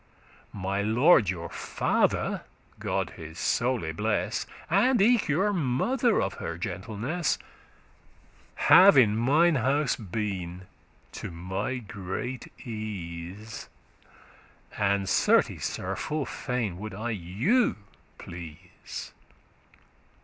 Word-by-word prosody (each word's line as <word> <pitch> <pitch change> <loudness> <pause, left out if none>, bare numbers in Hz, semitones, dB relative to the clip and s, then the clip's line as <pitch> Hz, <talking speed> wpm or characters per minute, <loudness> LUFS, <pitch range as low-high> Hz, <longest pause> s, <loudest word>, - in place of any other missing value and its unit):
My 100 0 -1
lord 115 - +5
your 85 -3 -3
father - - 0 0.4
(God - - -1
his 80 0 -9
soule 115 -10 0
bless) 105 +6 -1 0.2
And 225 +8 +3
eke 230 +2 +4
your 190 +8 +2
mother 200 - +1
of - - -1
her - - -4
gentleness, 120 - -2 1.2
Have 185 -4 +7
in 110 -5 +6
mnine 150 +7 +4
house 135 +4 +2
been, 95 -4 -4 0.5
to - - -6
my 90 +9 -3
great 105 +3 -5 0.2
ease:* 105 -1 -6 1.0
*satisfaction 105 - -3
And 100 -1 +2
certes, - - +3
Sir, - - -4
full 150 -2 -2
fain 120 -8 -3
would 105 -1 -6
I 115 +3 -3
you 110 - +1 0.4
please. 85 0 -9
110 Hz, 100 wpm, -27 LUFS, 95-140 Hz, 1.2 s, Have